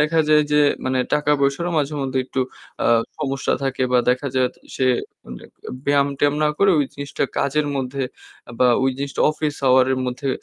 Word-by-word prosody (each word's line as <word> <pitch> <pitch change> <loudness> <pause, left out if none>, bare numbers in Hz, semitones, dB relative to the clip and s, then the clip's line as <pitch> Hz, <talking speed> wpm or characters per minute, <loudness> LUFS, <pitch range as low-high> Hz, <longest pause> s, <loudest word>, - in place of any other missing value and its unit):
দেখা 160 +2 +3
যায় 150 0 +5
যে 150 - +5 0.2
মানে 130 0 0 0.2
টাকা-পয়সারও 150 +3 +1
মাঝে 145 +1 -1
মধ্যে 130 0 -2
একটু 130 - -3 0.4
আ - - +3 0.3
সমস্যা 135 -3 -1
থাকে 135 -1 -1
বা 125 - +5
দেখা 130 +3 -1
যায় 130 -1 +2 0.3
সে 130 - 0 0.4
মানে - - -10 0.4
ব্যায়াম-ট্যায়াম 140 0 +2
না - - +3
করে 200 -1 +4
ওই 145 - +3
জিনিসটা 140 0 -3
কাজের 150 +2 0
মধ্যে 135 +1 -3 0.6
বা 125 - +4
ওই 135 - +3
জিনিসটা 140 0 -4
অফিস 150 -1 -3
আওয়ারের 130 0 +4
মধ্যে 130 +2 -3
140 Hz, 165 wpm, -21 LUFS, 130-150 Hz, 0.6 s, যায়